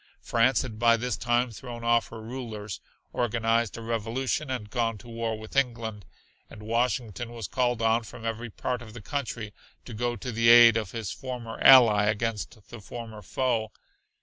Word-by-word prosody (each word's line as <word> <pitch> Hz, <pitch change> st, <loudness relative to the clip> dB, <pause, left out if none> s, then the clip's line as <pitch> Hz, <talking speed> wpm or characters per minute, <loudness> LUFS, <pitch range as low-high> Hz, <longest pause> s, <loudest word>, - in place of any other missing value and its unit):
France 120 Hz, +2 st, +2 dB
had 110 Hz, -4 st, -7 dB
by 115 Hz, 0 st, +5 dB
this 125 Hz, -1 st, -2 dB
time 120 Hz, 0 st, +1 dB
thrown 120 Hz, +1 st, -8 dB
off 115 Hz, 0 st, +3 dB
her 115 Hz, -1 st, -9 dB
rulers, 110 Hz, -5 st, -6 dB, 0.3 s
organized 115 Hz, -1 st, 0 dB
a 115 Hz, -, -7 dB
revolution 115 Hz, +5 st, -2 dB
and 115 Hz, -5 st, -4 dB
gone 115 Hz, -3 st, 0 dB
to 120 Hz, -, -15 dB
war 115 Hz, -1 st, -3 dB
with 110 Hz, +4 st, -11 dB
England; 115 Hz, -6 st, -1 dB, 0.4 s
and 105 Hz, -, -12 dB
Washington 115 Hz, 0 st, -1 dB
was 115 Hz, -4 st, -6 dB
called 120 Hz, -3 st, 0 dB
on 115 Hz, +1 st, +3 dB
from 115 Hz, +1 st, -10 dB
every 115 Hz, +1 st, -3 dB
part 125 Hz, +3 st, -3 dB
of 110 Hz, -1 st, -11 dB
the 115 Hz, -, -8 dB
country 120 Hz, -6 st, -4 dB, 0.3 s
to 120 Hz, -, -8 dB
go 120 Hz, +2 st, -1 dB
to 125 Hz, +3 st, -5 dB
the 115 Hz, 0 st, +3 dB
aid 120 Hz, -1 st, +9 dB
of 110 Hz, -4 st, -1 dB
his 110 Hz, -1 st, -5 dB
former 125 Hz, -3 st, -6 dB
ally 115 Hz, -6 st, +8 dB
against 110 Hz, -1 st, -2 dB
the 120 Hz, -, -9 dB
former 110 Hz, -1 st, -8 dB
foe. 115 Hz, +1 st, -1 dB
115 Hz, 175 wpm, -27 LUFS, 110-120 Hz, 0.4 s, aid